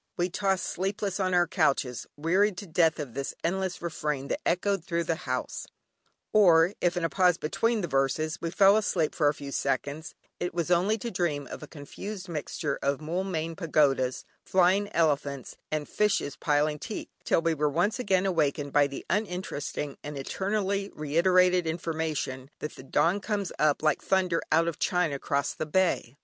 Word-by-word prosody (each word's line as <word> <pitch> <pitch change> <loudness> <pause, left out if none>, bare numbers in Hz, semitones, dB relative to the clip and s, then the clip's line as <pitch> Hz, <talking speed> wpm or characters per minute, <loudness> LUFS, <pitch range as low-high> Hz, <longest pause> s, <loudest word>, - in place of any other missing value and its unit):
We 175 0 0
tossed 195 -1 0
sleepless 195 +1 -2
on 185 -1 +1
our 175 0 +5
couches, 135 - 0
wearied 185 +6 +2
to 205 - -6
death 165 -1 +2
of 140 -6 -5
this 135 +1 -4
endless 185 0 -2
refrain 150 -4 -3
that - - -2
echoed 190 +1 +1
through 170 0 -1
the 160 -4 -3
house: 130 0 -3 0.7
or, 175 -3 +6
if 175 0 +1
in 175 - -1
a - - +3
pause 180 -2 +3
between 225 +8 0
the 175 - -2
verses 155 +4 0
we 165 - -2
fell 195 +4 +5
asleep 180 -7 0
for 150 - +2
a 145 - +3
few 140 -2 -7
seconds, 140 +4 -2 0.2
it 175 -1 -3
was 170 0 -1
only 185 +5 +3
to 235 +2 -5
dream 160 -7 -1
of - - -7
a 150 - -8
confused 185 +7 -8
mixture 150 -2 -3
of 140 0 0
"Moulmein 165 0 -2
Pagodas," 140 -7 +1 0.2
flying 190 +2 +3
elephants, 140 -5 0 0.2
and 155 -1 -2
fishes 200 -9 0
piling 150 0 +1
teak, 215 - -6
till 165 - +2
we 165 -1 +2
were 150 -1 +1
once 175 - 0
again 195 -5 +2
awakened 150 -5 0
by 145 -1 +5
the 140 - -8
uninteresting 180 -7 -3
and 150 -1 -6
eternally 195 +6 -1
reiterated 180 +3 +3
information 160 -5 -3
that 150 - -5
"the - - -11
dawn 155 +8 +1
comes 200 -2 -2
up 150 0 +2
like 155 -3 +2
thunder 185 -3 +1
out 165 +1 +4
of 170 - -3
China 180 -6 +1
'cross 140 +1 -1
the 155 - -4
Bay." 160 -7 +1
165 Hz, 175 wpm, -28 LUFS, 150-190 Hz, 0.7 s, or